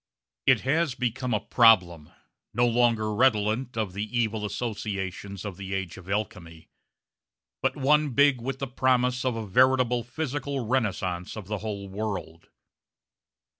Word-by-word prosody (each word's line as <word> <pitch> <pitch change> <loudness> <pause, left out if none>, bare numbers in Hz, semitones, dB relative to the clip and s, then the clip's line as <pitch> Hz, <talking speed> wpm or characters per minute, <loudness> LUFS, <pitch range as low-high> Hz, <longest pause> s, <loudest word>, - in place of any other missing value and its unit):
It 130 -4 +5
has 150 0 +1
become 125 0 -2
a 110 - +2
problem, 90 -11 +4 0.5
no 120 +2 +4
longer 115 -3 +2
redolent 115 +1 +1
of 105 -5 -2
the 100 +2 -3
evil 110 -2 0
associations 100 -3 -4
of 100 -4 -6
the 95 0 -4
age 95 -3 -4
of 95 0 -12
alchemy, 85 -6 -4 0.9
but - - 0
one 150 +2 +3
big 140 -1 +3
with 135 +2 -3
the 135 - -3
promise 125 0 +1
of 130 -2 0
a 115 -1 -4
veritable 125 +3 +3
physical 140 0 -3
renaissance 95 -7 -1
of 105 - -7
the 105 +1 -4
whole 100 -1 -5
world. 95 -5 -5
115 Hz, 140 wpm, -26 LUFS, 100-130 Hz, 0.9 s, It